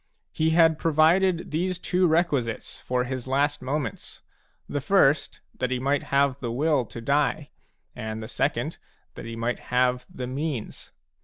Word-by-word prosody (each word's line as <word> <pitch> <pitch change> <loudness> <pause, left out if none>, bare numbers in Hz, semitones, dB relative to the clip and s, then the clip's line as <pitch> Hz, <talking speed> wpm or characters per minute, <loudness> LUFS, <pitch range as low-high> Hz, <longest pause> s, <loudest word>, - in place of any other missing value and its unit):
He 160 0 +1
had 160 -1 +4
provided 165 +3 +3
these 180 +3 -1
two 180 0 +1
requisites 150 -9 0
for 125 0 0
his 130 0 -5
last 145 +2 +1
moments, 140 +2 -4 0.2
— - - -42
the 145 - -3
first, 155 -5 +2 0.2
that 125 - 0
he 130 - 0
might 140 +2 +1
have 140 -1 +2
the 120 -3 -3
will 140 +1 +1
to 115 - -9
die, 145 +3 0 0.4
and 110 0 -5
the - - -6
second, - - -1 0.3
that - - -9
he 115 0 -6
might 115 +2 -2
have 125 0 +1
the 125 - -6
means. 130 -2 -4
140 Hz, 160 wpm, -26 LUFS, 125-160 Hz, 0.4 s, had